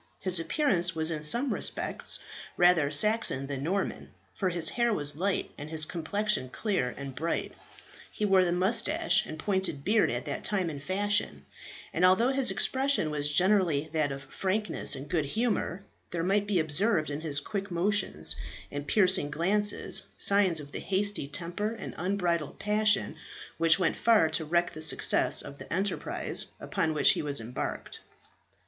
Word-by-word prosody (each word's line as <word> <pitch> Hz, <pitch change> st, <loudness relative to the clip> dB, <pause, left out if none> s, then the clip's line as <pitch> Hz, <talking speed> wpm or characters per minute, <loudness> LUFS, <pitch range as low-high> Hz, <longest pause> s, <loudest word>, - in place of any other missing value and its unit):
His 185 Hz, -2 st, +1 dB
appearance 180 Hz, -, +1 dB
was 160 Hz, +1 st, +4 dB
in 155 Hz, -2 st, -3 dB
some 240 Hz, -, +2 dB
respects -, -, -1 dB, 0.4 s
rather 175 Hz, -5 st, +4 dB
Saxon 155 Hz, -3 st, +2 dB
than 135 Hz, -1 st, -5 dB
Norman, 190 Hz, +7 st, -3 dB, 0.2 s
for 190 Hz, -, -1 dB
his 170 Hz, -3 st, -1 dB
hair 235 Hz, -1 st, 0 dB
was 145 Hz, -8 st, 0 dB
light 195 Hz, +3 st, -1 dB
and 145 Hz, +1 st, -7 dB
his 155 Hz, -1 st, -3 dB
complexion 180 Hz, -2 st, -1 dB
clear 195 Hz, -, -2 dB
and 140 Hz, 0 st, -7 dB
bright. 160 Hz, +6 st, -3 dB, 0.6 s
He 210 Hz, -, -2 dB
wore 190 Hz, -2 st, +4 dB
the 175 Hz, -, 0 dB
moustache 230 Hz, -, +2 dB
and 155 Hz, -, -7 dB
pointed 190 Hz, -5 st, -1 dB
beard 210 Hz, +1 st, +3 dB
at -, -, -3 dB
that -, -, -4 dB
time 185 Hz, -5 st, 0 dB
in 145 Hz, -, -7 dB
fashion; 205 Hz, +6 st, -1 dB, 0.5 s
and -, -, -1 dB
although 190 Hz, +7 st, +5 dB
his 270 Hz, -1 st, +4 dB
expression 265 Hz, -, +1 dB
was 145 Hz, -1 st, -1 dB
generally 170 Hz, -3 st, +2 dB
that 155 Hz, -3 st, 0 dB
of 135 Hz, 0 st, -7 dB
frankness 205 Hz, +3 st, -1 dB
and 135 Hz, +2 st, -8 dB
good 155 Hz, -2 st, -1 dB
humour, 205 Hz, -, -2 dB, 0.2 s
there 170 Hz, -1 st, -3 dB
might 200 Hz, +3 st, +1 dB
be 200 Hz, -4 st, +1 dB
observed 160 Hz, +1 st, +2 dB
in 145 Hz, +2 st, -4 dB
his 150 Hz, -3 st, 0 dB
quick 200 Hz, +5 st, -5 dB
motions 180 Hz, -, -1 dB, 0.4 s
and 145 Hz, 0 st, -6 dB
piercing 185 Hz, -6 st, +3 dB
glances 200 Hz, +7 st, +1 dB
signs 195 Hz, -5 st, +3 dB
of 145 Hz, -1 st, -10 dB
the -, -, -6 dB
hasty 200 Hz, -5 st, -1 dB
temper 175 Hz, +8 st, -2 dB
and 220 Hz, -, -8 dB
unbridled 175 Hz, -4 st, -1 dB
passion 210 Hz, 0 st, +1 dB, 0.4 s
which 165 Hz, 0 st, +5 dB
went 180 Hz, -4 st, 0 dB
far 220 Hz, -8 st, +3 dB
to 160 Hz, -, -2 dB
wreck 170 Hz, +2 st, +1 dB
the 155 Hz, -, -9 dB
success 160 Hz, -, +2 dB
of 140 Hz, -, -10 dB
the -, -, -11 dB
enterprise 190 Hz, +4 st, -1 dB
upon 160 Hz, -1 st, -2 dB
which 150 Hz, -, +5 dB
he -, -, -1 dB
was 145 Hz, -3 st, -1 dB
embarked. 115 Hz, +2 st, -5 dB
180 Hz, 165 wpm, -28 LUFS, 155-205 Hz, 0.6 s, although